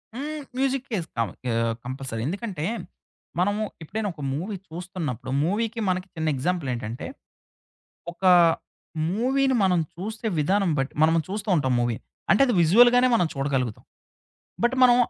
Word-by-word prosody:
హ్మ్. 300 +3 -4 0.2
మ్యూజికేస్తాం. 245 - -1 0.3
ఆహ్, 115 0 +1
కంపల్సరీ. 130 -3 -4
ఎందుకంటే, 190 -4 -3 0.7
మనము 205 +3 +1 0.2
ఎప్పుడైనా 205 +5 -3
ఒక 150 - -11
మూవీ 190 +8 -3
చూస్తున్నప్పుడు 160 - -5
మూవీకి, 225 +6 -1
మనకి, 185 +1 -1
చిన్న 160 0 -2
ఎగ్జాంపులేంటంటే. 130 -7 -2 1.1
ఒకా 185 +1 +4 0.8
మూవీని 265 +6 +2
మనం 180 -2 +3 0.2
చూసే 215 +5 -5
విధానం 190 +4 +2
బట్టి, 135 +1 -2
మనం 160 +1 +5
చూస్త 210 +2 -4
ఉంటాం 130 -3 +1
మూవీ. 120 -2 0 0.3
అంటే 195 - +5
అది 245 - +1
విజువల్‌గానే 240 +9 +6
మనం 180 -7 +3
చూడగలుగుతాం. 135 -5 -1 0.8
బట్ 240 +2 +3
మనం 245 -1 +7
180 Hz, 125 wpm, -25 LUFS, 140-220 Hz, 1.1 s, మనం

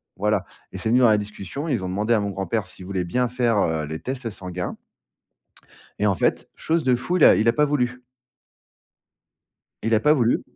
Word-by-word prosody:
voilà 105 -1 0 0.3
et - - -7
c'est 110 - -2
venu 125 +2 +4
dans 120 -3 +6
la 105 - +4
discussion 105 - -6
et 145 - 0
ils 110 - -1
ont 90 - -3
demandé 105 +5 0
à 110 - +3
mon 100 -1 -2
grand-père 95 +1 -2
s'il 95 0 -11
voulait 95 -2 -2
bien 125 +8 0
faire, 120 -3 0
heu, 80 -5 0
les 80 +1 -5
tests 130 -2 -4
sanguins. 90 -3 -6 1.2
Et 105 - +2
en 100 - +3
fait, - - 0
chose 165 0 0
de 125 -2 +3
fou, 175 +9 -2
il - - +6
a - - +8
il 110 - +1
a - - +5
pas 150 - +3
voulu! 125 -4 -1 1.8
Il 115 +1 +1
a 110 - +3
pas 150 +4 +4
voulu. 120 -5 +2
110 Hz, 215 wpm, -23 LUFS, 95-125 Hz, 1.8 s, a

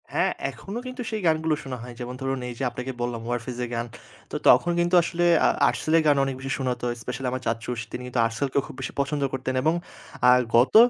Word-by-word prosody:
হ্যাঁ, - - +2 0.2
এখনো 200 +4 -7
কিন্তু 255 0 -6
সেই 220 -1 -3
গানগুলো 160 -1 +2
শোনা 130 -2 -5
হয়। 125 0 -8
যেমন 125 0 -5
ধরুন, 135 0 -1
এই - - -5
যে - - -2
আপনাকে 125 +2 -5
বললাম 120 -1 -2
'warfaze' 120 +1 -3
এর - - -8
গান। 115 0 -1 0.5
তো - - -5
তখন 175 - +6
কিন্তু 175 +1 +3
আসলে 175 +1 0 0.2
আ - - +7 0.2
'Artcell' 155 - +1
এর 165 - +3
গান 145 - +6
অনেক 135 -1 -2
বেশি 135 +1 -4
শোনাতো। 125 -2 -2 0.2
স্পেশালি 125 +3 -4
আমার 130 0 -3
চাচ্চু 115 +1 -2
তিনি 125 - -5
কিন্তু 125 -1 -2
'Artcell' 115 +4 -1
কেও 140 - +2
খুব - - -10
বেশি 135 - -4
পছন্দ 140 +1 0
করতেন। 130 0 -2
এবং 160 +2 +3 0.6
আর 125 - +6 0.2
গত 120 - +4
130 Hz, 225 wpm, -25 LUFS, 125-155 Hz, 0.6 s, আ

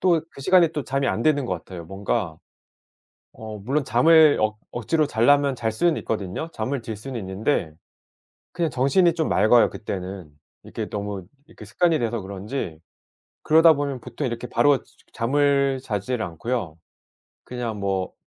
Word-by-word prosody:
또 175 -3 +3
그 - - -13
시간에 180 +3 +5
또 150 -3 -5
자면 135 0 0
안 115 - -2
되는 145 -2 +2
것 90 - -1
같아요. 85 0 -9
뭔가 95 -3 -2 1.0
어 110 -1 -8
물론 135 +8 -1
잠을 155 +6 +5
억 110 0 0
억지로 150 +6 0
자려면 140 +2 +3
잘 110 -2 -2
수는 165 +8 +1
있거든요. 105 - -4
잠을 130 +3 -3
들 110 -1 -6
수는 120 +3 -6
있는데 95 - -1 0.8
그냥 170 -3 -1
정신이 140 +7 +3
좀 160 -2 -1
맑아요 110 +4 +4
그때는. 95 -5 -6 0.3
이렇게 - - -6
너무 100 -3 -5 0.2
이렇게 - - -13
습관이 170 -3 +1
돼서 115 -1 -1
그런지 95 - -5 0.6
그러다 160 +1 +6
보면 140 -3 -3
보통 125 +3 -4
이렇게 120 +1 -5
바로 145 0 +3 0.3
잠을 140 +2 +2
자질 110 +1 -3
않고요. 90 +1 -4 0.7
그냥 120 -4 -5
뭐 95 -2 -2
120 Hz, 310 characters per minute, -23 LUFS, 100-145 Hz, 1.0 s, 그러다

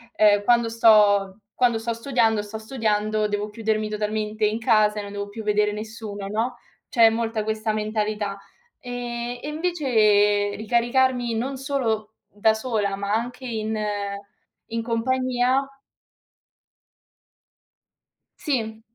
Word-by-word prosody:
ehm, 205 -1 +4
quando 235 +1 +3
sto 210 -3 +4 0.2
quando 245 -2 +3
sto 230 +1 -2
studiando, 230 -3 +1
sto 210 +1 -7
studiando, 215 -2 0
devo 210 0 -2
chiudermi 215 0 -1
totalmente 215 0 -1
in 215 +2 0
casa 215 -2 +3
e - - -2
non 200 - -8
devo 200 0 -4
più 220 +2 -7
vedere 210 0 +2
nessuno", 210 -1 -6
no, 220 +5 -1 0.3
c'è 230 -2 +6
molta 225 -1 -2
questa 220 0 -1
mentalità. 210 -1 -2 0.4
Ehm, 245 -2 -5
e - - -6
invece 215 -11 +2
ricaricarmi 240 +2 +1
non 260 +5 -2
solo 230 -6 -2
da 210 +2 +2
sola, 220 -3 -1
ma 200 +1 -2
anche 245 +3 -3
in 220 -2 -3 0.9
in 230 0 -2
compagnia 255 +2 +1 2.8
Sì, 225 -9 -2
220 Hz, 120 wpm, -24 LUFS, 210-240 Hz, 2.8 s, c'è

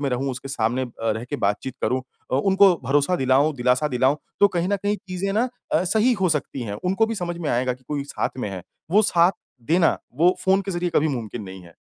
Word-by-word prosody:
में 140 - 0
रहूँ, 130 +2 -1
उसके 125 +2 -8
सामने 125 -1 0
अ, 125 - -5 0.3
रह 110 - -5
के - - -1
बातचीत 105 +6 -1
करूँ 130 0 0 0.3
अ, - - +3
उनको 195 +5 +5
भरोसा 145 +7 +2
दिलाऊँ, 135 +3 +2
दिलासा 125 +4 +2
दिलाऊँ, 130 +2 +2 0.2
तो 200 - +7
कहीं 175 -1 -1
न 200 - +1
कहीं 205 +1 +1
चीज़ें 185 +2 -2
ना 230 +5 +1 0.2
अ, 160 - +3
सही 220 +7 +3
हो 185 - +4
सकती 150 -4 -2
हैं, 105 -3 -4
उनको 195 +5 +2
भी 225 - -3
समझ 175 -4 -3
में 160 -4 -2
आएगा 125 +1 +1
कि 125 +1 -14
कोई 145 -2 -2
साथ - - -2
में 125 - -2
है, 95 -2 -6 0.3
वो 210 +4 +5
साथ 175 -2 +4 0.4
देना, 170 -1 +3 0.2
वो 175 +5 +4
फ़ोन 190 +1 +4
के 195 - -5
ज़रिए 175 -1 -1
कभी 155 - +3
मुमकिन 120 -5 -4
नहीं 95 -1 -9
है। 85 -1 -16
145 Hz, 235 wpm, -23 LUFS, 125-185 Hz, 0.4 s, तो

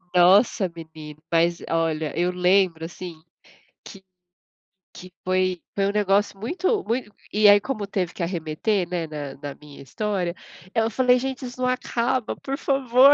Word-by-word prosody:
Nossa, 190 +1 +5
menino, 155 -2 -10
mas, 170 +1 +2
olha, 160 -2 -1
eu 175 +1 +2
lembro 180 -2 +2
assim 170 -1 -8 0.6
que 195 -1 -12 0.9
que 185 0 -11
foi 185 -1 0
foi 195 -1 +1
um - - +1
negócio 205 -1 +1
muito 370 - 0
muito 230 -2 -2 0.2
e 210 +1 +5
aí, 205 0 +8
como 215 -6 -3
teve 185 -4 -2
que 175 - -4
arremeter, 170 +3 -1
né, 175 -2 -2
na 145 -3 -6
na 145 -2 -6
minha 150 -1 -13
história, 185 +4 -2 0.4
eu 225 0 +2
falei: 250 +1 +3
"Gente, 265 0 -4
isso 250 +1 -8
não 250 - +2
acaba, 250 -1 -1
por 275 0 -4
favor", 270 -1 +5
190 Hz, 155 wpm, -24 LUFS, 170-230 Hz, 0.9 s, aí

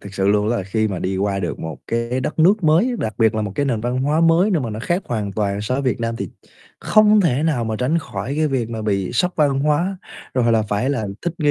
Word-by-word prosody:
Thực 100 0 -11
sự 95 0 +1
luôn 105 +1 +2
đó 120 - +1
là 95 - -2
khi 110 +3 -1
mà 95 -3 -3
đi 95 +1 -2
qua 100 0 0
được 85 - -3
một 80 -1 -6
cái 115 +2 -1
đất 140 +5 -4
nước 185 +3 +4
mới 160 +9 +4
á, - - -1
đặc 110 -2 -3
biệt 110 -1 +3
là 110 - -1
một 105 -2 -4
cái 140 - 0
nền 115 -5 0
văn 125 +2 -2
hóa 150 +3 +1
mới 165 +5 +4
nơi 165 -7 +1
mà 115 - -3
nó 110 +1 -5
khác 175 +9 -1
hoàn 105 -4 -3
toàn 100 -1 -1
so 110 +5 -2
với 140 - -1
Việt 130 -2 -1
Nam 115 0 -2
thì - - -4 0.5
không 215 0 +5
thể 145 -7 +1
nào 150 -8 0
mà 110 -1 -2
tránh 135 +7 +1
khỏi 140 -4 -5
cái 155 0 +2
việc 125 -5 -2
mà 110 -2 -4
bị 100 -2 -1
sốc 180 +9 +1
văn 140 -3 +2
hóa, 160 +7 +1 0.4
rồi 120 -2 +2
là 110 -1 +3
phải 105 +6 -1
là 110 -7 -2 0.2
thích 175 - -1
nghi, 150 -3 +2
120 Hz, 285 wpm, -20 LUFS, 105-155 Hz, 0.5 s, không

